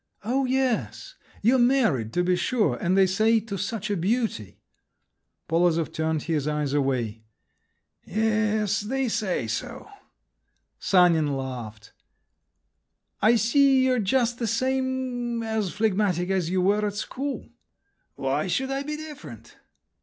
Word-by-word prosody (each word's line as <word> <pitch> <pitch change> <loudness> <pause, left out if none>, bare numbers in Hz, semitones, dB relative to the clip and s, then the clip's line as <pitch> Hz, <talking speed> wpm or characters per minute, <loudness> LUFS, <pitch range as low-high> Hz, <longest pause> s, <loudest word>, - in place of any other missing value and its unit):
"Oh, 260 +5 0
yes! 260 - -1 0.3
You're 250 +4 +4
married, 230 - +2
to 180 - +1
be 180 0 +2
sure, 230 +5 +1
and 185 0 0
they 195 - +6
say, 220 +5 +3
to 210 -2 -6
such 205 +1 -3
a - - +1
beauty!" 195 - -2 0.9
Polozov 165 -1 +1
turned 160 -1 -1
his 155 -4 -1
eyes 150 -2 -1
away. 125 -6 -1 0.8
"Yes, 215 -1 0
they 265 +5 -1
say 205 -4 -1
so." - - -5 0.9
Sanin 165 -6 +3
laughed. 120 -5 -7 1.3
"I 225 +3 +5
see 260 +4 +4
you're 255 -1 +2
just 240 +3 +1
the 235 - -1
same… 255 0 -1
as 220 -4 -2
phlegmatic 195 -4 0
as 185 -4 0
you 185 0 +1
were 205 +3 +2
at 205 -1 -2
school." 270 +6 -4 0.7
"Why - - -1
should 265 0 -1
I 270 0 -1
be 300 +1 -4
different?" 175 - -10
210 Hz, 130 wpm, -25 LUFS, 170-245 Hz, 1.3 s, they